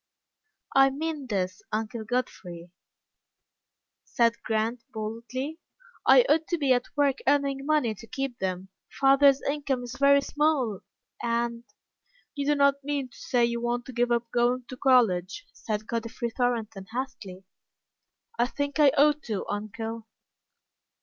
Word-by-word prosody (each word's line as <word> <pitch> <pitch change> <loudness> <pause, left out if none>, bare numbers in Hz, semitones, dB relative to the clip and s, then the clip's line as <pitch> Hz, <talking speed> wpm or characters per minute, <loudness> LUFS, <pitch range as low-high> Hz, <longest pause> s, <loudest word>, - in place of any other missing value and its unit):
"I 270 0 +7
mean 295 0 -4
this, 185 -4 -2
Uncle 220 +1 -3
Godfrey," 180 -8 -4 1.3
said 235 -1 +1
Grant, 225 +2 -1
boldly, 240 +7 -5 0.5
"I - - +7
ought 320 -4 +2
to 345 - 0
be 280 -4 +3
at 245 0 0
work 285 -2 +2
earning 280 -1 +1
money 300 -8 +2
to 220 +2 -13
keep 270 0 -4
them. 185 0 -3 0.3
Father's 275 0 +5
income 280 -3 -1
is 245 0 -7
very 280 0 +6
small, 280 -9 0 0.4
and 235 0 -1 0.4
" - - -37
"You 290 +1 +1
don't 280 0 +3
mean 280 -2 -2
to - - -18
say 245 -2 +2
you 235 0 -2
want 240 0 -1
to 260 - -9
give 240 0 +1
up 235 -1 0
going 245 +1 +1
to 255 - -6
college?" 245 - +2
said 215 -1 -4
Godfrey 230 +1 -3
Thornton, 225 -5 -2
hastily. 220 -7 -6 1.0
"I 245 - +3
think 285 +3 -3
I 295 -2 +7
ought 295 +1 +4
to, 210 -4 -3
uncle." 220 +2 -5
245 Hz, 140 wpm, -27 LUFS, 225-280 Hz, 1.3 s, I